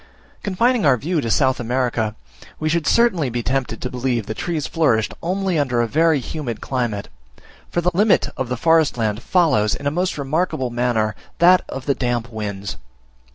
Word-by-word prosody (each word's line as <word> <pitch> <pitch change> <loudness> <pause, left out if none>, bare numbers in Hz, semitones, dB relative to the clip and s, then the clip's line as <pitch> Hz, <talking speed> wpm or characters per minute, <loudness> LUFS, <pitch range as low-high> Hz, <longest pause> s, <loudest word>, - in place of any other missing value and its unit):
Confining 230 +4 +1
our 135 -4 +4
view 160 +5 -1
to 115 - -3
South 130 +2 +2
America, 120 -3 -1 0.4
we 155 - 0
should 160 -2 0
certainly 190 - +3
be 120 0 -3
tempted 130 -3 -2
to 125 - -2
believe 125 -3 -1
that 110 - -6
trees 165 -4 -2
flourished 125 -10 +1
only 185 -1 0
under 125 -4 0
a 120 - +2
very 160 +3 +3
humid 125 -3 -5
climate; 120 -6 -2 0.6
for 175 - -1
the 180 +1 +1
limit 205 +4 +3
of 130 -2 -3
the 125 - -2
forest 160 -1 +3
land 110 -1 -1
follows, 150 - +2
in 140 - -9
a 145 - +1
most 180 +2 -1
remarkable 140 -2 -1
manner, 120 -3 0 0.2
that 180 +2 +6
of 135 -1 -6
the 140 - +2
damp 120 -2 -2
winds. 100 -3 -5
130 Hz, 180 wpm, -21 LUFS, 120-165 Hz, 0.6 s, that